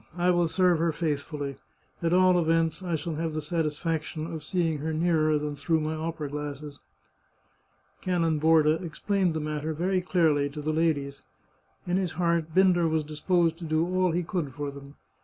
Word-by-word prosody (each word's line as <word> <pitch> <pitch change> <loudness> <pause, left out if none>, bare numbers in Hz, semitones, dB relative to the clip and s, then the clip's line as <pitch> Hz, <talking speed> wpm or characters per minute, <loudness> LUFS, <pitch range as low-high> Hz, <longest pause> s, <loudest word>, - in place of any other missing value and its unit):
I 175 +1 +3
will 175 -1 +2
serve 180 -1 +2
her 165 0 +2
faithfully. 150 -3 -3 0.4
At 165 -1 0
all 185 0 +5
events, 165 +1 +1
I 175 -3 -1
shall 160 0 -4
have 160 -1 -2
the - - 0
satisfaction 160 0 -2
of 160 -2 -6
seeing 165 -2 0
her 160 +2 -2
nearer 155 -2 +2
than 150 0 -3
through 160 +3 0
my 155 0 -2
opera 160 -1 -4
glasses." 145 0 -6 1.2
Canon 165 -4 +1
Borda 160 0 +4
explained 180 +1 -1
the - - 0
matter 155 +1 -3
very 185 +3 0
clearly 160 -6 +2
to 150 +1 -7
the 155 +1 0
ladies. 145 -4 0 0.6
In 180 +1 0
his 185 -3 -1
heart 170 -1 0
Binder 180 -3 +4
was 160 -1 0
disposed 165 +2 0
to - - -8
do 155 +1 +1
all 185 +1 +1
he 175 +2 0
could 165 -7 -3
for 145 -1 -4
them. 140 0 -12
160 Hz, 175 wpm, -27 LUFS, 150-175 Hz, 1.2 s, all